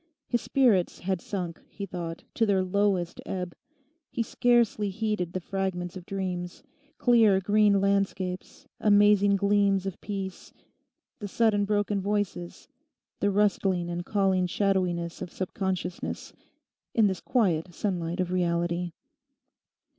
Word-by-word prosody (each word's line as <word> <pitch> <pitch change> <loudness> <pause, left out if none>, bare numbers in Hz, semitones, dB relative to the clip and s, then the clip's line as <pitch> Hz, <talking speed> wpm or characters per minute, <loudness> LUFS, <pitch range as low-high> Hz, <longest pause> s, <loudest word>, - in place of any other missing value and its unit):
His 240 -2 0
spirits 230 -10 +2
had 185 -1 -1
sunk, 180 -5 -5
he 200 - -6
thought, 170 -3 -6
to 225 - +1
their 195 -2 +3
lowest 185 -2 0
ebb. 180 -2 -4 0.6
He 230 - -1
scarcely 235 -3 +2
heeded 200 -4 -2
the 185 - -1
fragments 185 -1 -3
of 185 -1 -9
dreams—clear, 200 - 0
green 205 0 +4
landscapes, 195 -2 -1
amazing 205 -1 +5
gleams 200 -1 +2
of 195 -2 -5
peace, 195 -2 -6 0.7
the 205 - -4
sudden 205 -1 +2
broken 205 -1 0
voices, 200 -3 -3 0.5
the 205 - +2
rustling 195 -3 +1
and 175 0 -3
calling 190 -2 +1
shadowiness 180 -3 0
of - - -5
subconsciousness—in 190 +3 -4
this 190 -3 0
quiet 180 -9 +1
sunlight 175 -2 -2
of 180 -1 0
reality. 175 -1 0
195 Hz, 115 wpm, -27 LUFS, 180-205 Hz, 0.7 s, amazing